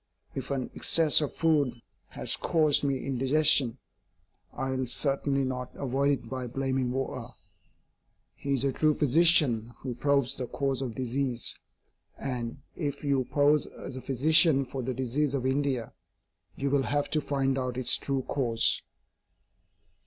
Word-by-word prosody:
If 135 -1 -6
an 135 -3 -3
excess 160 -2 +3
of 150 - -3
food 145 -7 +1 0.3
has - - -3
caused 155 -4 +2
me 140 -2 -1
indigestion, 135 -1 +3 0.7
I 135 0 -4
will 130 -1 -2
certainly 140 +1 0
not 125 -1 -4
avoid 140 +1 0
it - - -13
by 130 0 -5
blaming 130 0 -1
water. 130 -2 -4 1.1
He 140 0 -2
is 130 - -1
a 135 -1 0
true 155 +2 +2
physician 145 -6 +4
who 130 -2 -5
probes 140 0 0
the 125 - -3
cause 135 0 -2
of 120 -4 -4
disease 130 -1 -1 0.6
and, 125 0 -5
if 145 -4 -4
you 140 -3 +1
pose 145 +2 +2
as 130 - -9
a 130 - -6
physician 145 +2 +4
for 130 +1 -6
the 130 +1 -3
disease 130 +3 -1
of 130 -2 -2
India, 130 -3 -1 0.6
you 140 0 -2
will 140 -1 +3
have 145 0 0
to 155 - +1
find 135 -2 -1
out 125 -1 -3
its 125 -2 +4
true 135 -2 -2
cause. 120 -5 +1
135 Hz, 150 wpm, -28 LUFS, 125-145 Hz, 1.1 s, physician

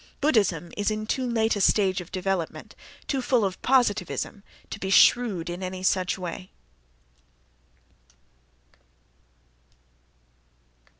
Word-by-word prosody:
—Buddhism 200 - +1
is 205 0 0
in 215 0 -3
too 255 +3 -1
late 225 -1 +1
a 205 - -2
stage 190 -2 +2
of 175 - -13
development, 185 -3 -3 0.3
too 270 -2 -1
full 245 -4 +2
of 190 -1 -4
positivism, 210 -5 0 0.3
to - - -6
be 190 - -4
shrewd 200 -3 +4
in 175 +2 -5
any 185 0 -5
such 185 0 +1
way. 185 0 -7
195 Hz, 110 wpm, -25 LUFS, 185-225 Hz, 0.3 s, shrewd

